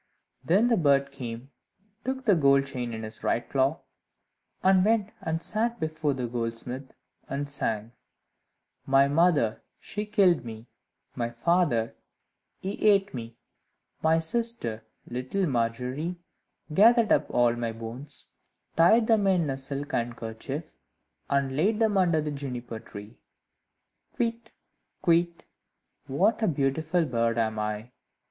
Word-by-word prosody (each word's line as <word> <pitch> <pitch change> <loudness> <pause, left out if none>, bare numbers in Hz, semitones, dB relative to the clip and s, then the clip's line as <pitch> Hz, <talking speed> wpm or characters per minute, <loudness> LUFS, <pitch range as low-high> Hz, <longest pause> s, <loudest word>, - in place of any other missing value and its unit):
Then 200 +8 +3
the 235 -2 +3
bird 140 -4 +3
came 120 -4 -6
and 195 - -27
took 265 0 -3
the 210 - +5
gold 140 -4 +4
chain 125 -3 -4
in 110 -1 -5
his 110 0 -7
right 120 - 0
claw, 135 +3 +1 0.8
and 190 -1 +5
went 215 -1 +2
and 165 +1 -2
sat 230 +2 -1
before 155 -2 -1
the 125 -2 -3
goldsmith, 120 +3 -4 0.4
and 140 +1 -3
sang 115 -6 -2 1.0
"My 135 +1 +5
mother, 145 -7 +2 0.2
she 210 +1 -5
killed 195 -6 +3
me; 115 0 -9 0.4
My 120 -1 -2
father, 120 -2 +1 0.7
he 195 +2 -4
ate 205 -2 +4
me; 115 -2 -7 0.6
My 160 0 +4
sister, 165 - -1 0.2
little 130 +11 -2
Margery, 125 +5 -1 0.6
Gathered 225 +4 +5
up 150 - +3
all 120 -1 +3
my 120 -1 -2
bones, 115 +5 -4 0.4
Tied 220 +8 +5
them 220 -3 +3
in 175 -7 +2
a 135 - -3
silk 140 +2 -5
handkerchief, 120 +5 -4 0.6
And 140 -1 +1
laid 205 +9 +2
them 220 -2 +2
under 175 -5 +3
the 150 0 -3
Juniper 125 -5 -5
tree: 105 -1 -11 1.0
Kywitt! 230 -1 -2 0.5
Kywitt! 170 0 +2 0.6
what 195 - +2
a 220 - +2
beautiful 155 +3 +1
bird 115 -3 0
am 110 -1 0
I!" 105 +2 -3
140 Hz, 130 wpm, -27 LUFS, 120-185 Hz, 1.0 s, the